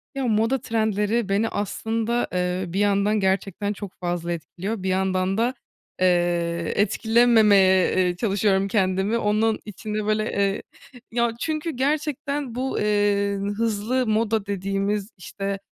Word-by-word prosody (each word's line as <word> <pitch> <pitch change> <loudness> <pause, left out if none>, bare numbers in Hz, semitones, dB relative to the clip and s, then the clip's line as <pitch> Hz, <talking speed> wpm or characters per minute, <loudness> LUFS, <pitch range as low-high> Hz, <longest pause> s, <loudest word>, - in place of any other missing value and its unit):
Ya 270 -2 -1
moda 225 +4 +2
trendleri 220 -1 0
beni 210 +3 +1
aslında, 225 +3 -1
eee, 180 +1 -1
bir 195 - 0
yandan 205 +1 +2
gerçekten 195 +1 -1
çok 200 -2 -8
fazla 175 -1 -2
etkiliyor. 185 +5 -5
Bir 190 - -1
yandan 190 0 0
da, 240 +3 +1 0.5
eee, 175 -2 +1
etkilememeye, 210 -4 +4
eee, 180 -1 +2
çalışıyorum 195 -1 +1
kendimi. 195 +1 +1
Onun 215 0 +1
için 210 +1 -7
de 215 -1 -1
böyle, 215 0 +1
eee, 200 0 0 0.5
ya, 235 0 +1
çünkü 315 +2 -2
gerçekten 285 -1 -2
bu, 260 +1 -2
eee, 205 -1 +1 0.2
hızlı 230 +3 0
moda 220 -1 +1
dediğimiz, 200 +1 -2
işte, 195 +2 -5
205 Hz, 130 wpm, -24 LUFS, 190-225 Hz, 0.5 s, etkilememeye